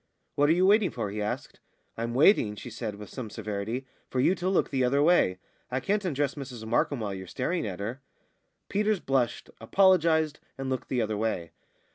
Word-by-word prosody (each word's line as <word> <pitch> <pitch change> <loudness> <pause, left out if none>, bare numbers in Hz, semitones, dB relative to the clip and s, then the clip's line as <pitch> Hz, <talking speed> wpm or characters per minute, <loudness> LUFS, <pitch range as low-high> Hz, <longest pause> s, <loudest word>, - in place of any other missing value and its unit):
"What 145 +1 +3
are - - +6
you 180 +2 +3
waiting 205 0 +5
for?" 110 -5 -4
he 105 +1 -3
asked. 105 - -4 0.4
"I'm 115 +1 -3
waiting," 130 - +5
she 120 - -8
said, 110 -2 -4
with 105 -1 -10
some 125 -5 -6
severity, 110 +4 -4 0.2
"for 130 - -2
you 150 +8 +4
to 185 0 -2
look 190 - +1
the 135 -2 +1
other 140 +3 +3
way. 155 - +4 0.3
I 130 +1 -1
can't 205 +7 0
undress 145 -6 0
Mrs 125 -6 -7
Markham 120 +4 +1
while 105 -2 -2
you're 95 -1 -7
staring 130 - -2
at 95 -2 -5
her." 115 +7 -4 0.7
Peters 210 0 +1
blushed, 130 -6 -1
apologised, 160 - +3 0.2
and 135 0 -3
looked 130 - -3
the 125 -3 +1
other 110 -1 -2
way. 105 -6 -2
130 Hz, 195 wpm, -28 LUFS, 110-160 Hz, 0.7 s, are